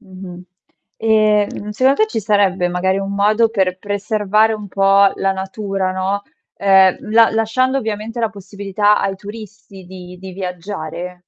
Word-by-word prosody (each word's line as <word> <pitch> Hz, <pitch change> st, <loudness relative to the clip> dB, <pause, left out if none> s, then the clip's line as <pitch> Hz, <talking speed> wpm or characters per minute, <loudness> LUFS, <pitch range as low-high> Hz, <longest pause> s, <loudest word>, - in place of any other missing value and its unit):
Mh-mh, 185 Hz, -3 st, -11 dB, 0.5 s
ehm, 215 Hz, -2 st, +1 dB
secondo 260 Hz, -, +2 dB
te 435 Hz, -, +3 dB
ci 225 Hz, -, -3 dB
sarebbe 195 Hz, -3 st, +1 dB
magari 190 Hz, +2 st, 0 dB
un 195 Hz, 0 st, -4 dB
modo 215 Hz, +3 st, +3 dB
per 190 Hz, -4 st, -1 dB
preservare 210 Hz, +2 st, 0 dB
un 210 Hz, -2 st, -6 dB
po' 195 Hz, +1 st, +4 dB
la 195 Hz, 0 st, 0 dB
natura, 190 Hz, 0 st, -3 dB
no, 190 Hz, +2 st, -2 dB, 0.3 s
ehm, 190 Hz, +1 st, +3 dB
la 225 Hz, +1 st, +5 dB
lasciando 255 Hz, +5 st, 0 dB
ovviamente 225 Hz, 0 st, -4 dB
la 225 Hz, -, 0 dB
possibilità 205 Hz, +1 st, -1 dB
ai 195 Hz, 0 st, -2 dB
turisti 205 Hz, -2 st, -11 dB
di 180 Hz, -1 st, -11 dB
di 190 Hz, 0 st, -9 dB
viaggiare? 180 Hz, -1 st, -6 dB
200 Hz, 145 wpm, -18 LUFS, 190-215 Hz, 0.5 s, la